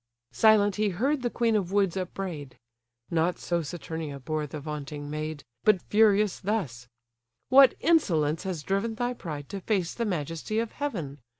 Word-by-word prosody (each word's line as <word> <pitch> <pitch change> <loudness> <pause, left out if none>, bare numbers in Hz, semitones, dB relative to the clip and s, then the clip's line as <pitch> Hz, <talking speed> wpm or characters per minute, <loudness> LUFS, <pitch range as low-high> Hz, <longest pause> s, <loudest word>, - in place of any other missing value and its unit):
Silent 210 -2 +4
he 210 0 +2
heard 260 - 0
the 245 - 0
queen 230 -1 +1
of 190 -4 0
woods 195 -3 +2
upbraid: 175 -8 -5 0.5
Not 170 +1 +1
so 170 -1 -1
Saturnia 160 -2 -6
bore 155 +2 -3
the 150 - -6
vaunting 145 -1 -6
maid: 155 0 -4 0.2
But 210 -3 +5
furious 210 0 +3
thus: 160 - -3 0.6
"What 270 0 +7
insolence 165 - +2
has 185 -6 -4
driven 200 +6 -1
Thy 245 +2 -1
pride 150 - -7
to 195 - -5
face 185 -4 0
the 235 - -2
majesty 165 +2 -3
of 230 0 -1
heaven? 170 - -4
180 Hz, 160 wpm, -27 LUFS, 155-215 Hz, 0.6 s, What